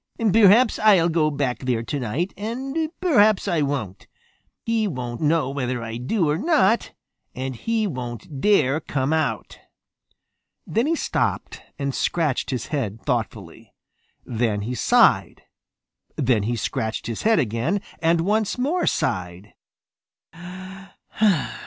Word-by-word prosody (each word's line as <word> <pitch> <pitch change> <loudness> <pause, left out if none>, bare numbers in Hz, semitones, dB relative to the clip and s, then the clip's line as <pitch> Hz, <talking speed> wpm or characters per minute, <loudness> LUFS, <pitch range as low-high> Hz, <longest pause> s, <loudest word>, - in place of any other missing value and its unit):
"Perhaps 225 +2 +5
I'll 195 -6 +5
go 160 -2 +2
back 140 -4 -2
there 125 -3 -1
tonight 140 - -3
and 270 +9 -3
perhaps 215 - +4
I 165 -3 +1
won't. 135 -10 -3 0.6
He 225 -2 +1
won't 125 -8 -5
know 150 -3 +1
whether 125 -3 -3
I 115 0 -5
do 160 - 0
or 150 +2 0
not, 285 - +2 0.4
and 130 0 -4
he 225 - -1
won't 130 - -6
dare 155 -9 +3
come 140 -1 -2
out." 145 -9 -2 1.1
Then 230 +6 0
he 330 - +2
stopped - - -2 0.2
and 140 -1 -2
scratched 155 -4 -1
his 125 -4 -3
head 115 -7 -2
thoughtfully. - - -4 0.5
Then 110 -3 -1
he 115 +5 -4
sighed. 120 - +3 0.7
Then 120 -4 +2
he 120 - 0
scratched 110 0 -3
his 115 0 -4
head 225 0 +3
again 125 - 0 0.2
and 165 0 +3
once 210 +5 0
more 300 +8 0
sighed. 90 +2 -2
150 Hz, 125 wpm, -23 LUFS, -, 1.1 s, Perhaps